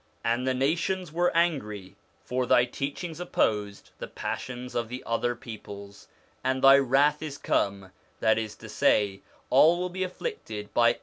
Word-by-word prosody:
'And 120 Hz, +3 st, +1 dB
the 130 Hz, -, +1 dB
nations 165 Hz, +5 st, 0 dB
were 175 Hz, +1 st, +2 dB
angry,' 105 Hz, -, -1 dB, 0.3 s
for 125 Hz, 0 st, -1 dB
Thy 120 Hz, -, +5 dB
teachings 145 Hz, +6 st, -5 dB
opposed 105 Hz, -, -1 dB
the -, -, -5 dB
passions 125 Hz, 0 st, -5 dB
of 115 Hz, -1 st, -2 dB
the 125 Hz, +1 st, -6 dB
other 120 Hz, +1 st, 0 dB
peoples: 100 Hz, -4 st, -10 dB, 0.2 s
' -, -, -36 dB
and 130 Hz, 0 st, 0 dB
Thy 135 Hz, +1 st, +9 dB
wrath 140 Hz, +3 st, +3 dB
is 150 Hz, -3 st, -5 dB
come/ 100 Hz, -1 st, -1 dB, 0.3 s
that 110 Hz, 0 st, +3 dB
is 110 Hz, -2 st, -5 dB
to -, -, -12 dB
say, 100 Hz, -2 st, +2 dB, 0.3 s
all 165 Hz, +3 st, +6 dB
will 180 Hz, 0 st, -2 dB
be 185 Hz, +1 st, -3 dB
afflicted 185 Hz, -, -6 dB
by 115 Hz, 0 st, +5 dB
1 -, -, -14 dB
i. -, -, -21 dB
125 Hz, 175 wpm, -27 LUFS, 110-155 Hz, 0.3 s, Thy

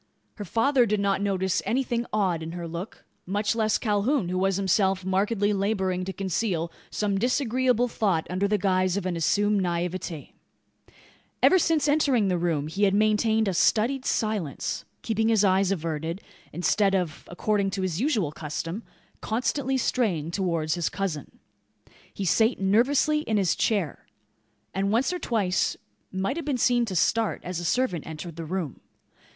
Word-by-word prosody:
Her 205 Hz, -, -5 dB
father 245 Hz, -, +3 dB
did 210 Hz, 0 st, +1 dB
not 200 Hz, -1 st, +1 dB
notice 190 Hz, -2 st, 0 dB
anything 240 Hz, +1 st, -1 dB
odd 190 Hz, -6 st, +1 dB
in 160 Hz, +1 st, -6 dB
her 175 Hz, -1 st, -5 dB
look. 170 Hz, +6 st, -7 dB, 0.2 s
Much 205 Hz, +4 st, 0 dB
less 220 Hz, -2 st, +2 dB
Calhoun, 210 Hz, 0 st, 0 dB
who 185 Hz, -, -1 dB
was 195 Hz, 0 st, +1 dB
himself 190 Hz, -1 st, +1 dB
markedly 205 Hz, +2 st, +1 dB
labouring 190 Hz, -2 st, 0 dB
to 190 Hz, -, -3 dB
conceal 185 Hz, -3 st, -2 dB, 0.2 s
some 200 Hz, -2 st, -1 dB
disagreeable 250 Hz, 0 st, +1 dB
thought 195 Hz, -8 st, 0 dB
under 185 Hz, +3 st, 0 dB
the 210 Hz, +1 st, +2 dB
guise 185 Hz, -1 st, +1 dB
of 200 Hz, -, -3 dB
an 180 Hz, -2 st, -1 dB
assumed 205 Hz, +5 st, +2 dB
naivete. 175 Hz, -2 st, -3 dB, 1.1 s
Ever 375 Hz, -, +6 dB
since 315 Hz, -3 st, +2 dB
entering 275 Hz, -8 st, +3 dB
the 180 Hz, -1 st, 0 dB
room 165 Hz, -4 st, 0 dB
he 195 Hz, +6 st, +1 dB
had 195 Hz, 0 st, +2 dB
maintained 215 Hz, +1 st, +2 dB
a 195 Hz, -, 0 dB
studied 235 Hz, +9 st, +2 dB
silence; 210 Hz, -, -2 dB, 0.2 s
keeping 225 Hz, 0 st, +1 dB
his 220 Hz, -3 st, +3 dB
eyes 190 Hz, 0 st, +3 dB
averted, 165 Hz, 0 st, -3 dB, 0.3 s
instead 195 Hz, +4 st, +2 dB
of, 180 Hz, -4 st, -2 dB
according 200 Hz, +2 st, 0 dB
to 195 Hz, 0 st, -3 dB
his 185 Hz, +1 st, -2 dB
usual 225 Hz, -, +1 dB
custom, 165 Hz, +6 st, -5 dB, 0.4 s
constantly 255 Hz, +4 st, -1 dB
straying 190 Hz, -, 0 dB
towards 170 Hz, -4 st, 0 dB
his 175 Hz, -3 st, -1 dB
cousin. 185 Hz, -8 st, -4 dB, 0.7 s
He 195 Hz, -, -4 dB
sate 225 Hz, +6 st, +3 dB
nervously 255 Hz, +10 st, +3 dB
in 225 Hz, -8 st, -1 dB
his 190 Hz, -4 st, +2 dB
chair; 200 Hz, -, -1 dB, 0.7 s
and 195 Hz, +1 st, 0 dB
once 250 Hz, +10 st, +2 dB
or 360 Hz, -, -3 dB
twice 195 Hz, -, 0 dB, 0.3 s
might 190 Hz, -, -2 dB
have 335 Hz, -, -4 dB
been 285 Hz, -4 st, 0 dB
seen 240 Hz, 0 st, +3 dB
to 195 Hz, -4 st, -5 dB
start, 220 Hz, +5 st, +1 dB
as 180 Hz, -1 st, -4 dB
a -, -, -5 dB
servant 180 Hz, -, 0 dB
entered 160 Hz, +1 st, -7 dB
the 165 Hz, 0 st, -6 dB
room. 165 Hz, -4 st, -4 dB
195 Hz, 160 wpm, -26 LUFS, 180-225 Hz, 1.1 s, Ever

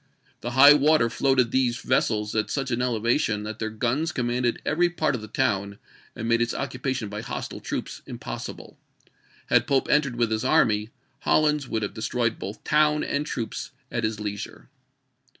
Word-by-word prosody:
The 120 Hz, +2 st, -5 dB
high 140 Hz, +2 st, +10 dB
water 145 Hz, -4 st, +3 dB
floated 130 Hz, -2 st, +2 dB
these 125 Hz, -2 st, +1 dB
vessels 105 Hz, -5 st, 0 dB
at 110 Hz, -1 st, 0 dB
such 135 Hz, -2 st, -2 dB
an 120 Hz, +1 st, 0 dB
elevation 115 Hz, -2 st, +1 dB
that 110 Hz, +1 st, -6 dB
their 110 Hz, -, -2 dB
guns 125 Hz, +9 st, -1 dB
commanded 120 Hz, -2 st, -1 dB
every 175 Hz, +3 st, +2 dB
part 160 Hz, -4 st, 0 dB
of 125 Hz, -, -3 dB
the 110 Hz, -, -8 dB
town, 100 Hz, -4 st, -1 dB, 0.4 s
and 115 Hz, -, -4 dB
made 115 Hz, 0 st, +3 dB
its 120 Hz, -, 0 dB
occupation 130 Hz, -3 st, -3 dB
by 105 Hz, +1 st, -5 dB
hostile 115 Hz, -, -5 dB
troops -, -, -5 dB
impossible. -, -, -7 dB, 0.7 s
Had -, -, +3 dB
Pope 135 Hz, -1 st, +2 dB
entered 150 Hz, -4 st, +2 dB
wdth 120 Hz, -2 st, 0 dB
his 110 Hz, 0 st, 0 dB
army, 105 Hz, -1 st, +3 dB, 0.3 s
HoUins 150 Hz, -3 st, +2 dB
would 110 Hz, -2 st, -2 dB
have 100 Hz, -, -3 dB
destroyed 115 Hz, +1 st, -1 dB
both 100 Hz, +3 st, -7 dB
town 150 Hz, 0 st, +3 dB
and 145 Hz, +1 st, -2 dB
troops 115 Hz, +1 st, -4 dB, 0.2 s
at 115 Hz, -1 st, -2 dB
his 110 Hz, -1 st, -1 dB
leisure. 105 Hz, +2 st, -6 dB
120 Hz, 170 wpm, -25 LUFS, 110-135 Hz, 0.7 s, high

